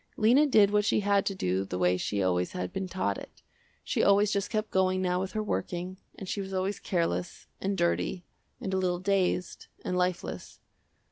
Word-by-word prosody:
Lena 250 +7 +5
did 210 -7 +5
what 210 0 +3
she 210 - +2
had 200 -1 +2
to 195 - -1
do 95 - 0
the 95 -2 -4
way 90 0 +3
she 100 +2 -1
always 90 -1 0
had 90 0 -4
been 190 -1 -3
taught 175 - -1
it. - - -13 0.4
She - - 0
always 200 +1 +4
just 200 -1 -1
kept 215 -1 -2
going 185 0 +2
now 180 -1 +1
with 190 0 -4
her 215 - -1
working, 180 - -3 0.2
and 195 - -7
she 200 - -2
was 190 0 -5
always 190 +2 -1
careless, 175 -1 -2 0.2
and 195 0 -1
dirty, 170 0 0 0.3
and 190 - -4
a - - +2
little 180 -1 +1
dazed, 185 -2 0 0.2
and 180 - -1
lifeless. 180 -1 -2
185 Hz, 200 wpm, -29 LUFS, 175-200 Hz, 0.4 s, Lena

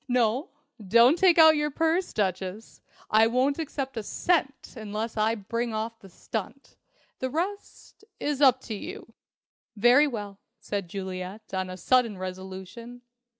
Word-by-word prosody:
No, 250 - +1 0.3
don't 235 - +5
take 350 -1 +4
out 320 -1 +8
your 300 0 0
purse, 325 +5 0
Duchess! 190 +1 -3 0.3
I 220 +1 +6
won't 260 +5 +1
accept 275 -4 -4
a - - -1
cent 275 - -1
unless 220 0 -5
I 220 +1 +1
bring 230 +2 -3
off 225 +1 -4
the 195 - -15
stunt. 220 +8 -7 0.4
The 260 - -2
rest 385 +8 -5 0.2
is 290 -1 -2
up 260 -2 +5
to 225 - -6
you." 365 - -8 0.6
"Very 245 +7 +5
well," 205 -6 -6 0.2
said 200 -3 -4
Juliet 190 +2 -7
on 185 -1 -2
a 185 - -7
sudden 230 +1 +2
resolution. 190 +6 -8
230 Hz, 145 wpm, -27 LUFS, 200-275 Hz, 0.6 s, out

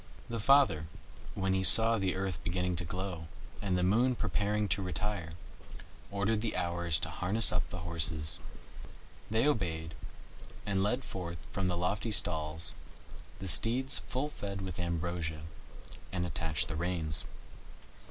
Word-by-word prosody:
The 115 - -2
father, 125 - +4 0.5
when 95 -1 0
he 95 0 +1
saw 115 +3 +8
the 95 -2 0
earth 95 -2 -3
beginning 90 +1 -1
to 85 - -1
glow, 90 -2 -5 0.3
and 95 -3 0
the 90 - 0
Moon 120 +7 +3
preparing 105 0 -1
to 100 - +1
retire, 90 -2 -3 0.8
ordered 100 +2 0
the 110 -1 -2
Hours 85 -2 0
to 80 - -2
harness 95 +7 +3
up 90 -2 -1
the 90 - -5
horses. 80 -2 -3 0.9
They 110 +6 +2
obeyed, 80 - -1 0.7
and 95 -1 0
led 125 +7 0
forth 85 -2 -6
from 95 -1 -1
the 90 -1 -1
lofty 100 +6 -1
stalls 80 -5 +2 0.6
the 95 - -6
steeds 115 - +5
full 135 +3 -2
fed 100 -8 -6
with 95 -1 -5
ambrosia, 85 -2 -3 0.7
and 90 -1 -2
attached 80 -3 -1
the 80 - -4
reins. 80 -2 0
90 Hz, 140 wpm, -31 LUFS, 85-105 Hz, 0.9 s, saw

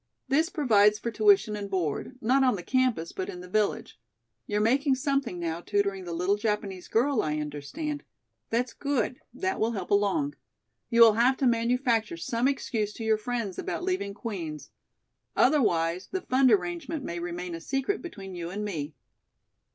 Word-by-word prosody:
This 310 +5 +3
provides 210 - +4
for 235 - -4
tuition 210 -1 +4
and 200 -1 -5
board, 185 - -2
not 260 +4 +3
on 255 -4 +3
the 180 - -6
campus, 255 -10 +1
but 185 - -4
in 180 - -7
the 180 - -10
village. 210 - -1 0.5
You're 210 - 0
making 265 +6 +3
something 275 - -1
now 170 -1 -3
tutoring 200 -1 -1
the 175 - -5
little 180 +4 +1
Japanese 210 -4 -2
girl, 250 +2 +2
I 150 0 -1
understand. 150 - -4 0.5
That's 240 +1 0
good. 280 -3 -1
That 375 +10 -2
will 225 +2 +1
help 190 -4 -5
along. 205 +9 +2 0.6
You 235 -1 +4
will 225 -2 +9
have 245 +4 +3
to 270 - 0
manufacture 235 -4 +1
some 230 +8 0
excuse 220 -6 -1
to 225 - -7
your 220 -1 +3
friends 220 -3 -3
about - - -3
leaving 360 - -2
Queen's. 175 -9 -6 0.6
Otherwise, 180 - +2
the 375 - -3
fund 260 -4 +3
arrangement 185 - 0
may 170 -5 -4
remain 175 0 -4
a 165 - -6
secret 270 - -1
between 195 - -8
you 170 -1 -5
and 205 +3 -4
me." 155 -7 -4
215 Hz, 170 wpm, -28 LUFS, 180-255 Hz, 0.6 s, will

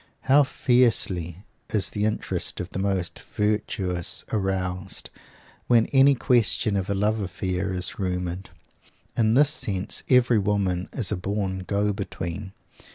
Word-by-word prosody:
How 140 +2 +5
fiercely 105 - +1 0.3
is 105 -3 +2
the 105 0 -1
interest 110 - -1
of 90 - -5
the - - -4
most 95 -3 -1
virtuous 100 -4 -1
aroused, 95 -2 -2 0.6
when 115 -2 +5
any 135 +1 +6
question 120 -4 +2
of 95 0 -2
a 100 - 0
love 105 +3 +1
affair 95 -1 -2
is 90 +2 -3
rumored. 90 -1 -3 0.7
In 110 0 +2
this 145 +2 +5
sense 100 -10 -1
every 125 -3 +4
woman 95 -3 0
is 110 -7 -2
a 105 - 0
born 95 0 -2
"go 100 +2 0
between." 95 +1 -5
100 Hz, 135 wpm, -25 LUFS, 90-110 Hz, 0.7 s, any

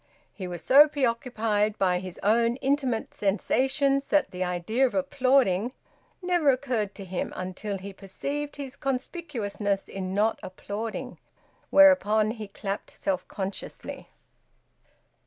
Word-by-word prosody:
He 185 - -6
was 175 -2 -6
so 285 +3 +8
preoccupied 230 -6 0
by 180 -2 +2
his 185 -1 -8
own 230 +3 +3
intimate 265 -4 -1
sensations 270 +7 +1
that 295 -10 +2
the 185 -1 -2
idea 180 +9 +1
of - - -7
applauding 260 -6 +2 0.5
never 350 -5 +3
occurred 250 -6 0
to 195 - -8
him, 185 -1 -3
until 185 +2 -4
he 195 +1 -8
perceived 280 +10 -5
his 280 -2 -7
conspicuousness 250 - -2
in 190 -1 -4
not 215 +2 +2
applauding, 210 +4 -6 0.5
whereupon 220 -8 +5
he 220 -2 -7
clapped 200 0 -5
self 190 -2 -3
consciously. 195 0 -6
220 Hz, 120 wpm, -27 LUFS, 195-275 Hz, 0.5 s, so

